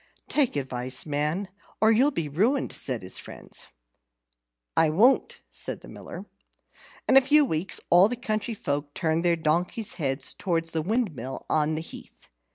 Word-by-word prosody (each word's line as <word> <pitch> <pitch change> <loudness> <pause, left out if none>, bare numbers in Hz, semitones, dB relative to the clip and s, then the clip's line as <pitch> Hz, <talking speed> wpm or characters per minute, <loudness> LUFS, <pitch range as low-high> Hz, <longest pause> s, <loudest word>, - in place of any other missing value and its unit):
"Take 280 - +2
advice, 130 -2 -2
man, 150 +6 -1 0.3
or 220 +1 +5
you'll 250 +6 +4
be 165 - -3
ruined," 220 - +1
said 125 -7 -1
his 90 - -1
friends. - - -5 1.1
"I 160 - +4
won't," 225 - +3
said - - -5
the - - -13
Miller. - - -9 0.8
In 265 - +6
a - - +9
few 295 +3 +5
weeks 165 - -2
all 180 +4 +7
the 245 - -2
country 225 -2 -2
folk 145 -5 -3
turned 165 -1 0
their 175 -1 +3
donkeys' 175 +7 0
heads 135 -1 +1
towards 165 -3 -1
the 160 - -1
windmill 165 - -2
on 155 0 +2
the 155 - -2
heath. - - -10
165 Hz, 160 wpm, -26 LUFS, 150-220 Hz, 1.1 s, a